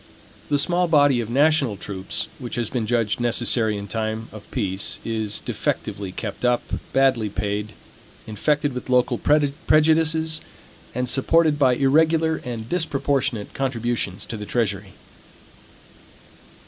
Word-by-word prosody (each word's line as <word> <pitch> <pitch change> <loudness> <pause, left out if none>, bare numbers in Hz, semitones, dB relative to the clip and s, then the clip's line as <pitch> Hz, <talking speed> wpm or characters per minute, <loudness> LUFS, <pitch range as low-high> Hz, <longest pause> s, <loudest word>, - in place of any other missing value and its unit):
The 145 - +3
small 175 +4 +1
body 145 -6 +4
of 115 - -6
national 140 -4 +3
troops, 95 -1 -4
which 125 -3 -5
has 120 -3 -2
been 120 -4 -2
judged 115 -2 0
necessary 120 -2 +2
in 100 0 -6
time 110 +1 -3
of 110 -1 -12
peace, 100 -5 -1
is 110 -2 -2
defectively 100 -2 -3
kept 105 +3 -6
up, 125 -1 +2 0.3
badly 130 -5 +2
paid, 105 +2 -3 0.5
infected 145 +6 0
with 125 +1 -6
local 125 -1 +2
prejudices, 155 +2 +2 0.5
and 125 0 -1
supported 150 +4 +2
by 130 -3 +4
irregular 160 +4 +3
and 115 -3 -5
disproportionate 140 - -1
contributions 120 -6 -2
to 115 - -5
the 105 - -6
treasury. 100 -5 -1
125 Hz, 125 wpm, -23 LUFS, 110-145 Hz, 0.5 s, body